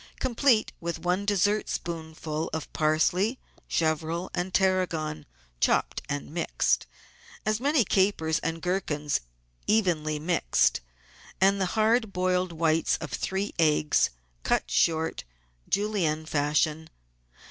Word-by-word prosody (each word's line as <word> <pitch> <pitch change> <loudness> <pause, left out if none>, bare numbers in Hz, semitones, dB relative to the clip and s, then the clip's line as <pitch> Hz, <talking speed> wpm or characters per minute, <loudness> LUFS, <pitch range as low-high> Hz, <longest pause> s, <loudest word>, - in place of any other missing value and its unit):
Complete 245 -2 +2
with 170 -1 -3
one 180 +3 0
dessertspoonful 165 -6 -1
of 160 -1 -5
parsley, 175 +9 +2 0.3
chervil, 160 +2 -1
and 180 +1 -2
tarragon 165 -6 0 0.3
(chopped - - +1
and 145 0 -4
mixed), 170 +1 0 0.6
as 215 0 +1
many 280 -2 +2
capers 185 -5 +2
and 165 0 -4
gherkins, 155 -6 -1 0.5
evenly 170 -8 +1
mixed, 65 - +1 0.6
and 195 +1 +4
the 190 - +2
hard 220 0 +3
boiled 180 -1 0
whites 165 -1 +1
of - - -7
three 195 +2 -2
eggs, 150 -2 +3 0.3
cut - - 0
short, 160 - +1 0.5
Julienne 190 -7 0
fashion. 150 +1 0
170 Hz, 105 wpm, -27 LUFS, 155-195 Hz, 0.6 s, and